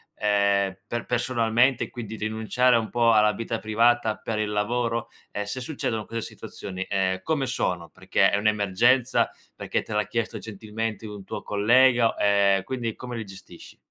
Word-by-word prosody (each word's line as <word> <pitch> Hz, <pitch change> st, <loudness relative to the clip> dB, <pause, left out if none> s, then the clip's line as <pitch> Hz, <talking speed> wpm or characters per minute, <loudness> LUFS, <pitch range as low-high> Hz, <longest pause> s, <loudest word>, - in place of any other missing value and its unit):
ehm, 100 Hz, -2 st, +2 dB
per 120 Hz, -, -3 dB
personalmente 120 Hz, +1 st, +1 dB
quindi 110 Hz, -3 st, -7 dB
rinunciare 110 Hz, +4 st, +1 dB
a 115 Hz, -, +4 dB
un 110 Hz, -, -4 dB
po' 120 Hz, -1 st, +3 dB
alla 105 Hz, -1 st, +4 dB
vita 115 Hz, +1 st, -4 dB
privata 115 Hz, +1 st, +2 dB
per 110 Hz, -1 st, -4 dB
il 105 Hz, -1 st, -1 dB
lavoro? 115 Hz, +2 st, -1 dB, 0.2 s
E 105 Hz, -, -3 dB
se 125 Hz, +6 st, -5 dB
succedono 115 Hz, -6 st, -3 dB
queste 115 Hz, 0 st, -4 dB
situazioni, 95 Hz, -1 st, -7 dB
ehm, 95 Hz, -1 st, 0 dB
come 155 Hz, -4 st, 0 dB
sono? 90 Hz, -9 st, -2 dB
Perché 95 Hz, +1 st, +2 dB
è -, -, +2 dB
un'emergenza, 110 Hz, +5 st, +2 dB, 0.3 s
perché -, -, -2 dB
te 110 Hz, -, -7 dB
l'ha 105 Hz, -1 st, 0 dB
chiesto 115 Hz, -1 st, -2 dB
gentilmente 110 Hz, +1 st, -5 dB
un 105 Hz, -2 st, -8 dB
tuo -, -, -6 dB
collega? 120 Hz, +3 st, +4 dB
Ehm, 100 Hz, -1 st, +3 dB
quindi 120 Hz, -3 st, -4 dB
come 125 Hz, -1 st, -7 dB
li 115 Hz, -, -4 dB
gestisci? 95 Hz, -3 st, -13 dB
110 Hz, 165 wpm, -25 LUFS, 100-120 Hz, 0.3 s, a